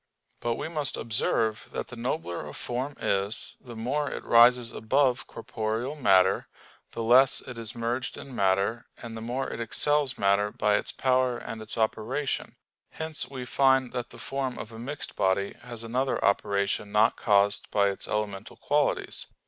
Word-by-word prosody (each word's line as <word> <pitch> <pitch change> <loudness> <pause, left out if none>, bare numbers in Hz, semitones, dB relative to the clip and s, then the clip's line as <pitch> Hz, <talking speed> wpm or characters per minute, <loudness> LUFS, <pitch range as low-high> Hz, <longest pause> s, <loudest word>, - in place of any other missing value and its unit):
But 120 -1 -1
we - - -4
must 150 -4 -2
observe 110 0 0
that - - -4
the 125 - -8
nobler 85 -8 -3
a - - -9
form 130 +4 -3
is, 100 +3 -1
the 120 -2 -10
more 140 +6 -1
it - - -6
rises 120 0 +6
above 130 +2 +1
corporeal 115 +3 -3
matter, 95 -10 +3 0.5
the 115 - -3
less 125 +3 +6
it 125 -2 -9
is 115 0 -5
merged 120 +3 -2
in 135 -2 -9
matter, 100 +4 +1
and 115 -2 -8
the 110 - -6
more 125 +4 -2
it - - -5
excels 145 +3 +2
matter 100 +1 +2
by 105 0 +1
its - - +2
power 130 -1 +1
and 115 -2 -7
its 110 +1 -4
operation; 115 +5 -1 0.3
hence 160 -5 -3
we 130 -2 -6
find 130 0 +3
that 125 -1 -4
the - - -13
form 135 -2 -3
of 110 - -7
a 115 - -10
mixed 145 +5 -5
body 95 +1 +1
has 120 -2 -8
another 125 +4 -1
operation 100 +1 +1
not 105 +2 +4
caused 100 -1 +2
by 100 -1 +3
its 100 - -5
elemental 105 -2 -3
qualities. - - 0
115 Hz, 170 wpm, -27 LUFS, 105-130 Hz, 0.5 s, rises